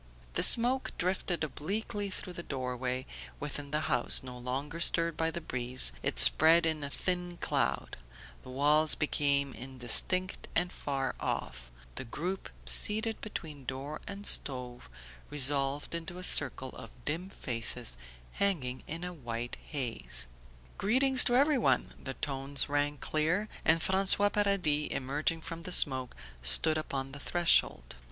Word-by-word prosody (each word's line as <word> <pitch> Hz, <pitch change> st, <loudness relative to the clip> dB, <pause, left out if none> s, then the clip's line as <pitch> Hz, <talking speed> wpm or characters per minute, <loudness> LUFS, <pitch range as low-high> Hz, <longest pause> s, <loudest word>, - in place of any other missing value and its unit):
The -, -, 0 dB
smoke 250 Hz, +3 st, +5 dB
drifted 180 Hz, -1 st, -2 dB
obliquely 200 Hz, -, -3 dB
through 185 Hz, -1 st, -5 dB
the 170 Hz, -, -7 dB
door 130 Hz, -5 st, -5 dB
way; 130 Hz, +1 st, -3 dB, 0.3 s
within 145 Hz, 0 st, -5 dB
the 150 Hz, +2 st, -1 dB
house, 140 Hz, -, +1 dB
no 125 Hz, -1 st, -9 dB
longer 135 Hz, +6 st, -5 dB
stirred 170 Hz, -1 st, +3 dB
by 160 Hz, +1 st, -1 dB
the 165 Hz, -, -5 dB
breeze, 125 Hz, -, -1 dB
it -, -, -2 dB
spread 160 Hz, -, +7 dB
in 160 Hz, -2 st, -1 dB
a 140 Hz, -, -4 dB
thin 175 Hz, +2 st, -2 dB
cloud; -, -, -2 dB, 0.4 s
the -, -, -14 dB
walls 150 Hz, +4 st, +2 dB
became 140 Hz, -2 st, 0 dB
indistinct 130 Hz, -, +2 dB
and 175 Hz, +1 st, 0 dB
far 135 Hz, -2 st, -3 dB
off; -, -, -5 dB, 0.3 s
the -, -, -5 dB
group 180 Hz, +10 st, -5 dB, 0.2 s
seated 220 Hz, +2 st, +3 dB
between 155 Hz, -9 st, -7 dB
door 135 Hz, +4 st, -6 dB
and 200 Hz, +1 st, -8 dB
stove 125 Hz, -, 0 dB, 0.4 s
resolved 140 Hz, 0 st, +2 dB
into 170 Hz, +1 st, -6 dB
a 185 Hz, -, -7 dB
circle 130 Hz, -6 st, +2 dB
of -, -, -11 dB, 0.2 s
dim 170 Hz, +6 st, -3 dB
faces 115 Hz, -, -2 dB, 0.4 s
hanging 145 Hz, -11 st, -2 dB
in 165 Hz, +3 st, -6 dB
a 180 Hz, 0 st, -5 dB
white 120 Hz, -5 st, -6 dB
haze. 115 Hz, -, -4 dB, 0.5 s
"Greetings 260 Hz, +4 st, +5 dB
to 245 Hz, -, +2 dB
everyone!" 280 Hz, -1 st, +2 dB
The 135 Hz, -, -6 dB
tones 140 Hz, -1 st, -2 dB
rang 145 Hz, 0 st, -1 dB
clear, 170 Hz, +10 st, -1 dB
and 160 Hz, +1 st, +3 dB
François 195 Hz, +2 st, +3 dB
Paradis, 190 Hz, -8 st, +1 dB
emerging 145 Hz, +5 st, -2 dB
from 165 Hz, 0 st, -7 dB
the 180 Hz, -, -7 dB
smoke, 130 Hz, -6 st, +3 dB, 0.3 s
stood 155 Hz, -, +4 dB
upon 135 Hz, -3 st, -5 dB
the 145 Hz, -, -9 dB
threshold. 170 Hz, -, +1 dB
150 Hz, 145 wpm, -30 LUFS, 130-180 Hz, 0.5 s, spread